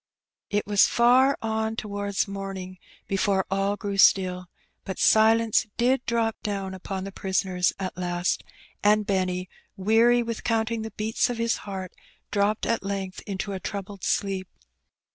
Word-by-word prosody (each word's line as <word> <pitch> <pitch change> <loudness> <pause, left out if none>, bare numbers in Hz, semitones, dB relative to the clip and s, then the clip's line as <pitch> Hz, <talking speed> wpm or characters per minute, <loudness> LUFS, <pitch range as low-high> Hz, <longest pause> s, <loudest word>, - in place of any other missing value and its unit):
It 205 0 0
was 205 -1 +5
far 255 +3 +4
on 220 0 -1
towards 205 -3 -2
morning 195 -2 -6 0.3
before 195 -1 +1
all 195 +1 +1
grew 200 -1 -4
stilly 180 -2 +4 0.4
but 190 - -5
silence 220 0 +4
did 250 +2 +2
drop 230 -1 0
down 195 -2 -3
upon 190 0 -5
the 195 - -6
prisoners 190 -2 0
at 190 -1 -4
last; 175 0 -1 0.4
and 210 +1 +4
Benny^ 185 -2 -1 0.3
weary 230 +5 +4
with 230 -1 -5
counting 225 0 0
the 220 - -5
beats 220 +2 -1
of 245 - -3
bis 230 0 +1
hearty 190 -2 -5 0.4
dropped 205 +1 +1
at 230 - 0
length 195 -1 -4
into 200 0 -3
a 190 - -4
troubled 200 -1 -6
sleep. 195 -2 -1
200 Hz, 145 wpm, -26 LUFS, 190-220 Hz, 0.4 s, was